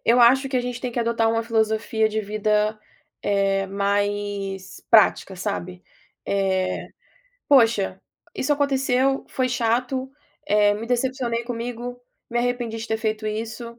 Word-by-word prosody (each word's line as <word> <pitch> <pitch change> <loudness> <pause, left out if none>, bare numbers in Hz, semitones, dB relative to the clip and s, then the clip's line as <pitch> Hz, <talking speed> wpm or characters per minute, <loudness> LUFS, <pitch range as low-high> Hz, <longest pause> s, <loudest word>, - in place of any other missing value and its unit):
Eu 240 +2 +5
acho 265 +3 +5
que 260 - -1
a - - +2
gente 245 -1 -4
tem 250 - -3
que 240 - -3
adotar 230 -1 +1
uma 230 0 0
filosofia 220 -1 +1
de 220 0 -1
vida, 215 +1 0 0.4
eh, 195 -1 +1
mais 200 -1 -2
prática, 205 -3 +4
sabe. 185 -2 -4 0.4
Eh, 190 -2 0 0.6
"poxa, 225 -8 +4 0.3
isso 295 +3 0
aconteceu, 270 -2 +1
foi 255 -1 0
chato, 250 +3 0 0.4
eh, 205 -2 +4
me 220 +2 -5
decepcionei 245 -1 -1
comigo, 245 +1 -5 0.3
me 240 - 0
arrependi 240 -2 -1
de 225 - -5
ter 220 - +1
feito 215 -1 -2
isso, 230 +2 -5
225 Hz, 140 wpm, -23 LUFS, 205-245 Hz, 0.6 s, Eu